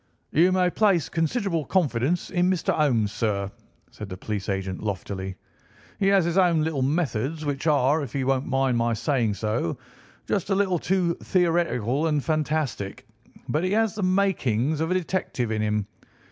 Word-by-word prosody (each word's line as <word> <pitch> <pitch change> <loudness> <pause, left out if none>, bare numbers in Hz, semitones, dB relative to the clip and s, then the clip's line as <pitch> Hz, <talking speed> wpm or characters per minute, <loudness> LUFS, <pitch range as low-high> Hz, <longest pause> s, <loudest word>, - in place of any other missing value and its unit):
"You 175 +5 +4
may 180 -1 +2
place 195 -6 +2
considerable 165 0 0
confidence 155 -1 0
in 180 -1 +2
Mr. 185 -3 +1
Holmes, 120 -9 +2
sir," 100 -3 -1 0.4
said 105 - -8
the 95 - -6
police 100 0 -4
agent 95 -1 -3
loftily. 95 -2 -4 0.6
"He 195 - +2
has 195 -3 +4
his 170 +2 +2
own 170 -4 +3
little 155 -4 -1
methods, 145 0 -1
which 145 +1 -2
are, 150 0 +3
if 135 -5 -5
he 140 -2 -1
won't 135 0 0
mind 135 -2 +1
my 115 0 +1
saying 120 -5 0
so, 105 -5 -2 0.5
just 195 -1 -1
a 195 - +2
little 190 -3 +1
too 180 -1 +1
theoretical 165 - +1
and 150 -3 0
fantastic, 155 -10 -2 0.4
but 155 +3 0
he 185 +2 0
has 220 -2 +2
the 210 - -5
makings 160 - +1
of 160 - 0
a 185 - +1
detective 155 -10 -2
in 110 -1 -1
him. 105 -1 0
150 Hz, 170 wpm, -25 LUFS, 115-180 Hz, 0.6 s, You